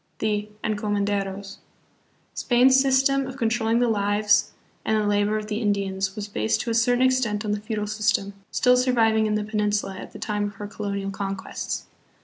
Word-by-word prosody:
"The 210 -1 -1
Encomenderos." 200 -2 -2 0.8
Spain's 260 +2 +4
system 270 0 +2
of 265 0 -8
controlling 230 -1 +1
the 245 - +3
lives 210 -1 +2 0.3
and 220 - +1
the 210 - 0
labor 205 +1 +1
of 215 - -4
the 215 +1 -3
Indians 195 -2 -1
was 210 -1 -5
based 110 - 0
to 230 - -3
a - - 0
cer 235 +2 +3
tain 255 - +3
extent 235 -5 +1
on 210 - -1
the 210 0 -2
feudal 215 -1 -3
system, 210 -1 0 0.2
still 250 0 +3
surviving 225 -4 +3
in 210 - 0
the 210 - -1
Peninsula 210 -2 -1
at - - -9
the - - -10
time 210 -1 -2
of 205 0 -6
her 205 - -7
colonial 200 -1 -4
conquests. 195 -1 -4
210 Hz, 180 wpm, -24 LUFS, 205-230 Hz, 0.8 s, Spain's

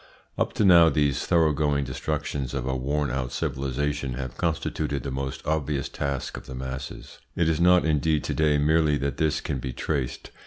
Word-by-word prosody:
Up - - -1
to 105 - +1
now 85 -3 +8
these 70 -2 +1
thoroughgoing 75 -4 +2
destructions 70 0 -3
of - - -2
a 65 0 -1
worn 70 +2 -1
out 65 -1 -2
civilisation 70 +1 -2
have 65 -1 -5
constituted 75 -4 -2
the 70 - -4
most 65 +1 -4
obvious 75 -2 -1
task 70 -2 -3
of - - -10
the 65 - -7
masses. 65 +1 -7 0.2
It 85 - +2
is 80 0 +1
not 90 0 +5
indeed 75 -1 +1
to - - -2
day 75 -1 +3
merely 75 0 +3
that 70 -1 -2
this 80 -2 +1
can 65 - -3
be 65 0 -5
traced. 70 -1 -3
70 Hz, 185 wpm, -26 LUFS, 65-80 Hz, 0.2 s, now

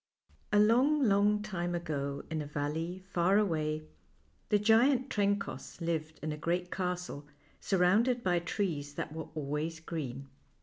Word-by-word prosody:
ALONG, 245 +8 +4
long 210 -1 +3
time 175 -4 -2
ago, 140 -5 -3
in 160 -1 -1
a 145 - -5
valley 160 +5 -3
far 180 +3 +3
away, 155 -6 0 0.7
the 210 - +5
giant 240 +5 +4
Trencoss 200 -10 -1
lived 160 -2 -2
in 155 - -2
a 150 - -4
great 175 +3 -1
castle, 180 -5 -3 0.3
surrounded 210 +7 +3
by 175 -1 +2
trees 165 -5 -2
that 150 - -4
were 160 -1 -6
always 155 +2 -2
green. 140 -5 -5
175 Hz, 135 wpm, -32 LUFS, 155-205 Hz, 0.7 s, the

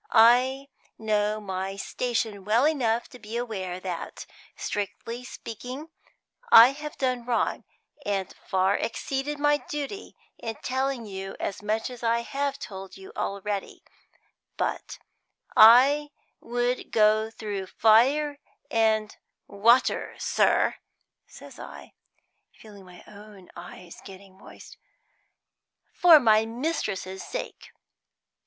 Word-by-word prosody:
I 255 +4 +4 0.3
know 215 -1 0
my 190 -1 -4
station 220 -1 -3
well 225 +6 +3
enough 240 -7 +1
to 250 - -13
be 220 +1 -6
aware 190 -7 -4
that, 180 -3 -6 0.3
strictly 230 +4 -5
speaking, 250 +6 -8 0.6
I 230 +2 +10
have 295 +2 -7
done 255 -2 -1
wrong, 240 -1 -1 0.4
and 195 -2 -2
far 190 +1 +2
exceeded 270 +5 -3
my 295 0 +3
duty, 295 +6 -6 0.2
in 225 -1 -5
telling 260 -2 -2
you 195 -1 -7
as 195 - -4
much 215 +3 -2
as 245 - -10
I 230 0 +1
have 280 +3 -3
told 195 -6 -9
you 190 - -12
already; 200 0 -4 0.7
but - - -3 0.6
I 265 +7 +7 0.3
would 245 +1 -2
go 215 0 +3
through 205 -4 -5
fire 275 +9 +3 0.3
and 220 -2 +1 0.3
water, 230 +5 +2
sir," - - +2 0.5
says - - -14
I, - - -11 0.6
feeling 205 -3 -15
my 180 -1 -15
own 205 -3 -14
eyes 175 0 -11
getting 190 0 -13
moist, - - -14 1.2
"for 340 -3 +7
my 220 -4 +4
mistress's 225 - -3
sake. - - -7
225 Hz, 110 wpm, -26 LUFS, 200-255 Hz, 1.2 s, I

